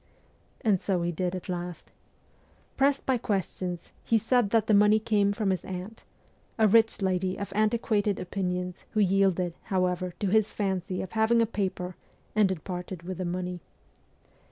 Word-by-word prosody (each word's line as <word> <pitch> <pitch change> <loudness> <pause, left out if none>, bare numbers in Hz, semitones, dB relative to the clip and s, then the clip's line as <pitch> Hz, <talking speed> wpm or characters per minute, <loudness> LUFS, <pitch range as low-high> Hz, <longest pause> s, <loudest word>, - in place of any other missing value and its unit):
And 210 -7 +2
so 185 -3 0
he 175 - 0
did 180 +2 -2
at 185 - -7
last. 175 -2 -5 0.8
Pressed 275 +1 +2
by 260 -2 +1
questions 185 -5 -3
he 230 - +3
said 230 0 +2
that 225 0 +3
the 220 - +2
money 210 +1 +6
came 210 -2 +2
from 205 -1 0
his 185 - -2
aunt 190 +4 -7 0.5
a 220 -1 +5
rich 225 0 +4
lady 185 0 0
of 200 -1 -5
antiquated 215 -1 +1
opinions 180 -1 -3
who 215 - +1
yielded, 190 -3 +2
however, 180 -2 -1
to 200 - 0
his 215 +1 +3
fancy 190 -2 -2
of 190 - -8
having 220 +1 +3
a 230 - +4
paper 185 -4 -3 0.4
and 210 -3 +4
had 185 -5 -3
parted 180 -1 -6
with 185 0 -6
the 185 - -2
money. 180 0 -3
195 Hz, 165 wpm, -28 LUFS, 180-215 Hz, 0.8 s, money